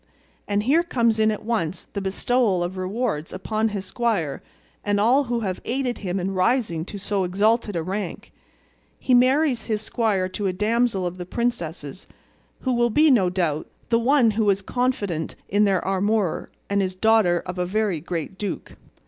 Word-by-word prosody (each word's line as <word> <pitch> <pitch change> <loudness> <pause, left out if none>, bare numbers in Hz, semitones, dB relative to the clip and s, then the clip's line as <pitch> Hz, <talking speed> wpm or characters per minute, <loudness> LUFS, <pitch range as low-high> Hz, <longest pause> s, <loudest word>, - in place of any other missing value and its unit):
And 205 0 0
here 290 +8 +4
comes 235 -10 +1
in 220 0 +4
at 215 0 -3
once 200 -7 -1
the 200 - -6
bestowal 195 0 +1
of 175 +2 -4
rewards 185 -3 -2
upon 215 +4 -1
his 200 -3 -4
squire 195 - -1 0.4
and 205 0 +1
all 255 +7 +4
who 240 -1 -1
have 190 -4 -3
aided 250 0 -2
him 190 -1 -2
in 190 +2 -2
rising 185 -4 +1
to 205 - -7
so 200 0 -1
exalted 205 +3 +1
a 165 - -1
rank. 190 +1 -5 0.7
He 255 - 0
marries 255 0 +3
his 215 -2 -1
squire 210 -5 0
to 195 +2 -2
a 185 - 0
damsel 210 0 +1
of 175 +1 -4
the 180 - -5
princess's, 175 - -3 0.5
who 260 - 0
will 240 0 +2
be, 300 +6 +5
no 195 -8 +4
doubt, 170 -5 -1 0.2
the 230 -1 +3
one 245 -1 +4
who 215 +1 0
was 200 -1 +2
confidante 205 -10 -1
in 205 +2 +3
their 195 -3 +2
amour, 195 -1 0 0.2
and 200 0 +1
is 185 -1 -2
daughter 205 -4 +3
of 180 0 -5
a 180 - 0
very 205 -3 0
great 170 +3 -5
duke." 205 - -5
205 Hz, 180 wpm, -23 LUFS, 185-235 Hz, 0.7 s, be